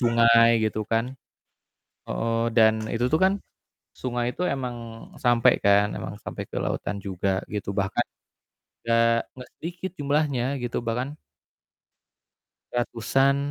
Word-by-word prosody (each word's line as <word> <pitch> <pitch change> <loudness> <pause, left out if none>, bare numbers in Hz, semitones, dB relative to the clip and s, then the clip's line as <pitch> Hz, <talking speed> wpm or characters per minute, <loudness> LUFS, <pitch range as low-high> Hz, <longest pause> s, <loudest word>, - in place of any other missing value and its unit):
sungai 115 -1 +5 0.2
gitu 110 0 -1
kan. 115 +4 0 0.9
Heeh, 115 0 -1
dan 110 -1 +6 0.2
itu 120 +2 0
tuh 155 - +3
kan 190 - +4 0.6
sungai 120 -1 -2
itu - - -6
emang 125 -3 -3 0.5
sampe 120 -2 +5 0.2
kan, 100 +1 +4
emang 100 - -6
sampe - - -5
ke - - -6
lautan 100 - -2
juga 95 0 -1
gitu 105 -1 -3
bahkan 100 +4 0 0.8
nggak 115 0 +2
nggak 125 -1 -11
sedikit 175 +2 -5
jumlahnya 145 -3 +1 0.2
gitu 120 - -2
bahkan 125 +5 -2 1.6
ratusan, 120 +3 +2
115 Hz, 120 wpm, -25 LUFS, 115-130 Hz, 1.6 s, dan